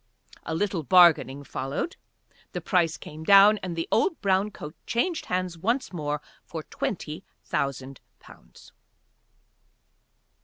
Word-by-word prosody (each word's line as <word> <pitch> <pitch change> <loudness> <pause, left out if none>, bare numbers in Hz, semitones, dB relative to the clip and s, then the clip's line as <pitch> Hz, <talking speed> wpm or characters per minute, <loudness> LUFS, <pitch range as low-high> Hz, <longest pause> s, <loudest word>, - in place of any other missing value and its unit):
A 160 - -2
little 190 -1 -1
bargaining 155 -3 +5
followed, 135 - -4 0.6
the - - -2
price 170 -4 +1
came 155 +1 -10
down 200 +3 +7
and 180 -3 -5
the 165 - -3
old 390 -6 +2
brown 195 +1 +1
coat 150 -6 -9
changed 320 +8 -1
hands 180 -2 -2
once 235 +5 -1
more, 150 -3 -3 0.2
for 160 -2 -7
twenty 160 0 -4 0.2
thousand 135 -1 -3 0.2
pounds. - - -17
175 Hz, 120 wpm, -26 LUFS, 150-200 Hz, 0.6 s, down